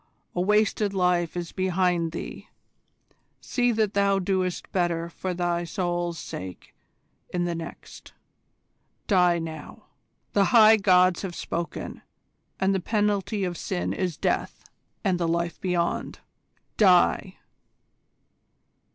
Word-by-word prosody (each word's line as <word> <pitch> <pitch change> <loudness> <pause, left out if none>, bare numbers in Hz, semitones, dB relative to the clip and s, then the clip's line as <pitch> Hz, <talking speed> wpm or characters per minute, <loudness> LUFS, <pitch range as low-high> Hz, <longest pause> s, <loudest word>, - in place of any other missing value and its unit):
A 175 - -1
wasted 210 +1 +2
life 180 -2 +1
is 170 -1 -4
behind 180 -3 0
thee: - - -7 0.9
see 245 -1 0
that 215 -2 +1
thou 200 -1 +3
doest 185 -1 -1
better 170 -2 -1
for 185 +2 -4
thy 175 -1 -1
soul's 175 0 -2
sake 95 - -8 0.6
in 175 -1 -1
the 175 - -1
next. 165 -1 -9 0.9
Die 180 -4 +4
now! 160 -1 -7 0.5
The 200 -1 +4
High 220 -1 +7
Gods 185 -3 +4
have 185 -3 -5
spoken, 170 0 -5 0.6
and 190 +1 +2
the 190 - +1
penalty 205 +1 0
of 180 -2 -2
sin 90 +1 -2
is 180 - -2
death - - -1 0.4
and 185 -4 +1
the 170 - 0
life 170 0 -1
beyond. 175 -2 -1 0.6
Die!" 185 -1 +4
180 Hz, 115 wpm, -26 LUFS, 170-195 Hz, 0.9 s, High